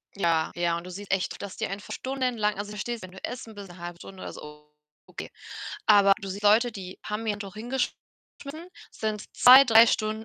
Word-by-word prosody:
Ja, 165 -4 +1
ja 170 -1 0
und 170 - -7
du 185 - -8
siehst 200 +2 -8
echt, 190 -1 -1
dass 200 -2 -7
die - - -2
einfach 200 +1 -7
stundenlang 250 -6 -1
also, 205 0 -5
ich - - -8
verstehe 240 +4 -3
es, 225 - -12
wenn 185 -1 -10
du 190 - -13
essen 230 -3 -6
bist 200 -2 -9
'ne 175 - -14
1/2 175 0 -7
Stunde 190 -1 -11
oder - - -7
so, 150 0 -12 0.3
okay. - - -8 0.6
Aber 200 -2 +6
du 195 - -6
siehst 200 +2 -6
Leute, 220 +3 +4
die 185 -2 -8
haben 215 +2 -4
ihr 210 - +1
Handtuch 205 -1 -7
hingeschmissen, 245 +3 -4 0.8
sind 215 -1 -3
2, 260 +2 +9
3 230 -1 +7
Stunden 215 0 -1
205 Hz, 215 wpm, -27 LUFS, 185-225 Hz, 0.8 s, 2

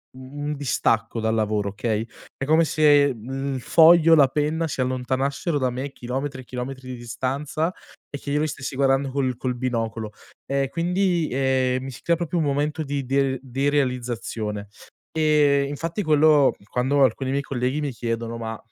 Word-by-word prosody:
un 140 +3 -7
un 150 - -2
distacco 115 -5 0
dal 110 0 0
lavoro 105 -2 0
okay, 110 +2 -2 0.3
è 135 - -3
come 160 +3 +4
se, 145 -3 +4
mhmm, 135 +4 -4
il - - -3
foglio, 165 +3 +6
la 140 -3 +6
penna 155 +3 0
si 145 - -5
allontanassero 130 +5 -1
da 130 - +1
me, 130 +3 -4
chilometri 135 +2 -4
e - - -13
chilometri 130 +1 -6
di 130 - -5
distanza, 135 +8 -3 0.4
e 140 - -5
che 140 - -6
io 150 - +2
li 155 - +1
stessi 135 -2 -5
guardando 135 0 +2
col 130 -3 0
col 125 0 -3
binocolo, 115 -3 -3 0.3
e 135 -1 -1
quindi, 175 0 0
ehm, 130 -1 +1
mi 135 - -6
si 120 - -11
crea 170 - +2
proprio 170 +1 -3
un 160 - +1
momento 145 +2 -1
di 140 -2 -3
der 135 0 +1
derealizzazione, 125 -6 -2 0.4
e 150 -3 +3
infatti 165 +7 -3
quello 150 -3 +4
quando 135 +3 +2
alcuni 130 +1 +1
miei 140 - 0
colleghi 135 +2 -2
mi 145 - -2
chiedono: 115 -1 -3
"Ma, 115 -1 -5
135 Hz, 175 wpm, -23 LUFS, 125-145 Hz, 0.4 s, foglio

